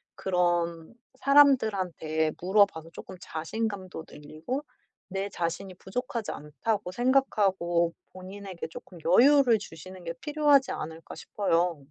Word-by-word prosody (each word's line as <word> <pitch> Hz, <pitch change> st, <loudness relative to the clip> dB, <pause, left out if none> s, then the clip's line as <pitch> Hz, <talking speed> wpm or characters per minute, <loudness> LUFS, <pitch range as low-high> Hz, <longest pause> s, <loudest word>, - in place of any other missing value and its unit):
그런 175 Hz, -1 st, 0 dB, 0.3 s
사람들한테 195 Hz, -, +3 dB
물어봐서 185 Hz, -3 st, +2 dB
쪼끔 185 Hz, -, -10 dB
자신감도 185 Hz, 0 st, -4 dB
늘리고 155 Hz, -, -6 dB, 0.5 s
내 195 Hz, +1 st, -3 dB
자신이 180 Hz, +2 st, -3 dB
부족하지 230 Hz, +4 st, -4 dB
않다고 180 Hz, +6 st, -3 dB
생각하고 195 Hz, -10 st, +2 dB, 0.2 s
본인에게 185 Hz, -1 st, -8 dB
쪼끔 175 Hz, +2 st, -11 dB
여유를 245 Hz, -, +6 dB
주시는 185 Hz, 0 st, -11 dB
게 165 Hz, -, -3 dB
필요하지 295 Hz, -3 st, +3 dB
않을까 160 Hz, +1 st, -7 dB
싶어요. 175 Hz, -4 st, 0 dB
185 Hz, 290 characters per minute, -28 LUFS, 170-220 Hz, 0.5 s, 여유를